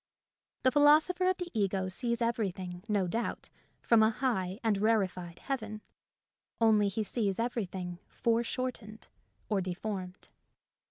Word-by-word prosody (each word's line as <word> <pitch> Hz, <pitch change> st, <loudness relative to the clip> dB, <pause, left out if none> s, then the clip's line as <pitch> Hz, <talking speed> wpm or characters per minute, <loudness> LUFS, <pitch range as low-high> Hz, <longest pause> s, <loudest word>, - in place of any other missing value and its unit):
The 260 Hz, -, +5 dB
philosopher 310 Hz, +6 st, +5 dB
of 370 Hz, -, +1 dB
the 355 Hz, -1 st, -5 dB
ego 195 Hz, -3 st, 0 dB
sees 235 Hz, +5 st, -1 dB
everything, 190 Hz, -6 st, -2 dB
no 205 Hz, -3 st, +1 dB
doubt, 225 Hz, +7 st, -3 dB, 0.3 s
from 230 Hz, -2 st, +5 dB
a 220 Hz, -, +6 dB
high 215 Hz, -6 st, -1 dB
and 215 Hz, -3 st, +2 dB
rari 215 Hz, -2 st, +3 dB
fied 175 Hz, -2 st, -9 dB
heaven; 220 Hz, -6 st, -4 dB, 0.8 s
only 215 Hz, -3 st, +4 dB
he 205 Hz, +3 st, -1 dB
sees 205 Hz, -3 st, -1 dB
everything 190 Hz, -7 st, -3 dB
fore 230 Hz, 0 st, +1 dB
shortened 230 Hz, -3 st, -5 dB, 0.4 s
or 205 Hz, -3 st, +1 dB
deformed. 185 Hz, 0 st, -5 dB
215 Hz, 130 wpm, -31 LUFS, 190-235 Hz, 0.8 s, a